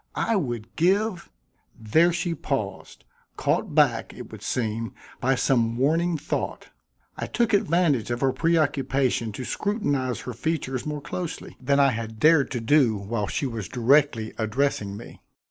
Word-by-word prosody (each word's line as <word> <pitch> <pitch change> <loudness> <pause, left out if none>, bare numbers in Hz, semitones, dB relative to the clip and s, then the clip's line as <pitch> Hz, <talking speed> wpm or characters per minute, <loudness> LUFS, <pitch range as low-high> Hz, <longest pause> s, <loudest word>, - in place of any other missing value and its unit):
I 230 - +1
would 120 - -3
give 190 +3 +1 0.3
" - - -32
there 170 +2 +6
she 175 0 -1
paused, - - -4 0.3
caught - - 0
back, - - +2
it - - -10
would - - -10
seem, 115 -1 -2 0.2
by 135 +2 +2
some 115 -3 +1
warning 165 +6 +2
thought. 155 +2 -4 0.5
I - - -3
took 235 -2 0
advantage 165 - +2
of 120 0 -2
her 135 -1 +3
preoccupation 140 -7 +1
to 125 +4 -6
scrutinize 145 - -1
her 125 - -6
features 135 0 -2
more 150 -1 -3
closely 170 +3 -6
than 140 +2 +2
I 140 -1 +5
had 110 -1 -5
dared 155 -1 +5
to 125 - -3
do 115 -2 +3
while 100 +1 -3
she 140 - -2
was 115 -7 -4
directly 125 -2 +2
addressing 110 -3 -1
me. 115 - -12
135 Hz, 155 wpm, -25 LUFS, 115-165 Hz, 0.5 s, there